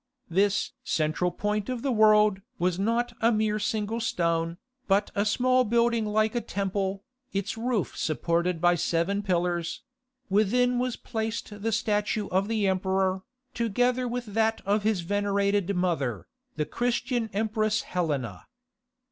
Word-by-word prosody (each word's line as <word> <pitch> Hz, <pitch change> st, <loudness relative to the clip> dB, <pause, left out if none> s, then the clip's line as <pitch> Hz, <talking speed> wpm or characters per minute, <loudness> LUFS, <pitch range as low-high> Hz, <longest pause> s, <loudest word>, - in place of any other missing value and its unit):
This 200 Hz, +3 st, +2 dB
"central 155 Hz, +3 st, 0 dB
point 210 Hz, +3 st, -2 dB
of 250 Hz, -2 st, -3 dB
the 275 Hz, -, +1 dB
world" 215 Hz, -3 st, +5 dB, 0.2 s
was 180 Hz, +1 st, 0 dB
not 235 Hz, +4 st, 0 dB
a 230 Hz, +1 st, +4 dB
mere 215 Hz, -1 st, +1 dB
single 215 Hz, +1 st, -1 dB
stone, 170 Hz, -4 st, 0 dB, 0.3 s
but 200 Hz, +1 st, +2 dB
a 200 Hz, -, +1 dB
small 255 Hz, +3 st, +3 dB
building 235 Hz, -1 st, +2 dB
like 215 Hz, +1 st, +1 dB
a 240 Hz, -, 0 dB
temple, 195 Hz, -1 st, -2 dB, 0.3 s
its 200 Hz, +1 st, -2 dB
roof 230 Hz, -4 st, -1 dB
supported 170 Hz, +2 st, 0 dB
by 175 Hz, +1 st, +4 dB
seven 175 Hz, +4 st, 0 dB
pillars; 175 Hz, -3 st, -1 dB, 0.4 s
within 245 Hz, +5 st, +2 dB
was 250 Hz, -1 st, -1 dB
placed 220 Hz, -3 st, -4 dB
the 225 Hz, +2 st, 0 dB
statue 210 Hz, -1 st, 0 dB
of 190 Hz, +2 st, +1 dB
the 215 Hz, -3 st, +1 dB
emperor, 190 Hz, 0 st, +1 dB, 0.3 s
together 245 Hz, +3 st, +1 dB
with 245 Hz, 0 st, -3 dB
that 225 Hz, +1 st, +2 dB
of 205 Hz, +2 st, +2 dB
his 210 Hz, -3 st, +1 dB
venerated 200 Hz, +1 st, 0 dB
mother, 165 Hz, -, -1 dB, 0.3 s
the 150 Hz, -, -1 dB
Christian 245 Hz, -, -1 dB
Empress 215 Hz, +1 st, 0 dB
Helena. 140 Hz, -, -3 dB
205 Hz, 140 wpm, -27 LUFS, 185-225 Hz, 0.4 s, world